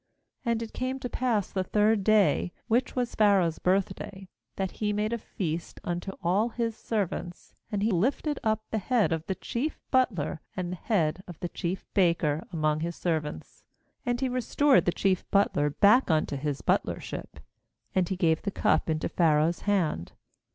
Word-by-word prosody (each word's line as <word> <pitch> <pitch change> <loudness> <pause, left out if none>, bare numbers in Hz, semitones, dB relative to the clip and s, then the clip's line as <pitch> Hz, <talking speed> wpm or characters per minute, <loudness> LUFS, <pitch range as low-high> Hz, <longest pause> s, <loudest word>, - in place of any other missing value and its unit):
20And 230 -1 +1
it 225 - -9
came 255 +1 -2
to 260 - -4
pass 235 -5 0
the 190 - 0
third 210 +1 +2
day, 210 -3 +3 0.2
which 240 +2 +1
was 245 -2 -1
Pharaoh's 195 -6 +3
birthday, 190 +1 -1 0.3
that 190 -1 -2
he 210 -1 +1
made 210 +2 0
a 235 - -1
feast 170 -6 -4
unto 175 +2 -3
all 195 +7 +2
his 230 -1 -2
servants; 190 -6 -3 0.2
and 205 -1 -1
he 220 - +2
lifted 265 - 0
up 220 0 +1
the 220 - 0
head 225 -1 +2
of 160 -1 -1
the 190 - -1
chief 275 +11 -3
butler 195 - +1 0.2
and 180 -1 -2
the - - -3
head 175 -4 0
of 175 -3 -10
the 175 - -3
chief 180 +3 -4
baker 170 -4 +2
among 155 -2 +1
his 170 +1 -3
servants. 155 - -3 0.5
21And 245 0 +1
he 260 - +1
restored 260 +3 +3
the 175 - +3
chief 190 0 +1
butler 170 -7 +3
back 205 - +4
unto 155 -3 +1
his 140 0 -3
butler - - +1
ship; - - -7 0.5
and 185 -2 +1
he 190 - 0
gave 165 -3 +2
the - - -2
cup 195 - +1
into 155 0 0
Pha 165 -3 +3
raoh's 160 +3 +2
hand. 160 - 0
195 Hz, 180 wpm, -28 LUFS, 170-220 Hz, 0.5 s, back